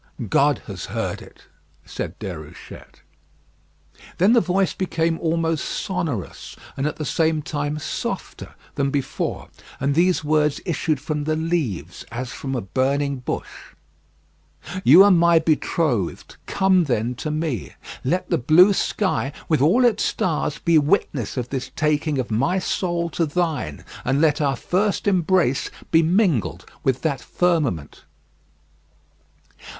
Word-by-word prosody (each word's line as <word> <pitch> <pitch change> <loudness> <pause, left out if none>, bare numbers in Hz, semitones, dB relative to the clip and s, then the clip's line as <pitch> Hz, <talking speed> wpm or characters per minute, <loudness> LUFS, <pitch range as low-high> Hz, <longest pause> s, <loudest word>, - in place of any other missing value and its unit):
"God - - +3
has - - -6
heard - - -3
it," - - -16 0.4
said - - -6
Déruchette. 85 -8 -9 1.2
Then 195 +6 +4
the 235 - +5
voice 190 0 +1
became 165 -3 -1
almost 165 -1 0
sonorous, 170 - -4 0.2
and 135 +2 -1
at 150 - -3
the 155 - -5
same 160 0 +1
time 145 0 -3
softer 150 - -5 0.2
than 140 0 0
before, 135 -1 -3 0.3
and 140 +1 +1
these 175 +2 +2
words 150 -1 +1
issued 160 -4 -1
from 150 +1 -3
the 155 0 0
leaves 160 - -2
as 120 +1 -5
from 135 -1 -4
a 120 - -1
burning 140 +6 0
bush: 125 - -4 1.4
"You 175 +7 +9
are 205 - +6
my 170 -1 +5
betrothed. 155 - 0
Come 190 -2 +3
then 120 -3 0
to 155 - -4
me. 150 - -3 0.3
Let 175 +8 0
the 170 - +2
blue 170 - +6
sky, 190 -8 0 0.2
with 155 -5 +2
all 205 - +4
its 235 - +2
stars, 155 -4 -1
be 165 -2 +3
witness 145 - 0
of 125 -1 -3
this 135 -2 -4
taking 150 -1 0
of 125 -3 -2
my 135 - +1
soul 175 -2 -1
to 165 +1 0
thine; 155 - -2 0.2
and 135 +2 +1
let 155 -1 +3
our 140 -2 +1
first 195 +8 -1
embrace 180 -7 +2 0.2
be 165 - +6
mingled 170 - +1 0.2
with 130 -1 0
that 140 -5 -1
firmament." 150 - -1
155 Hz, 135 wpm, -22 LUFS, 135-175 Hz, 1.4 s, You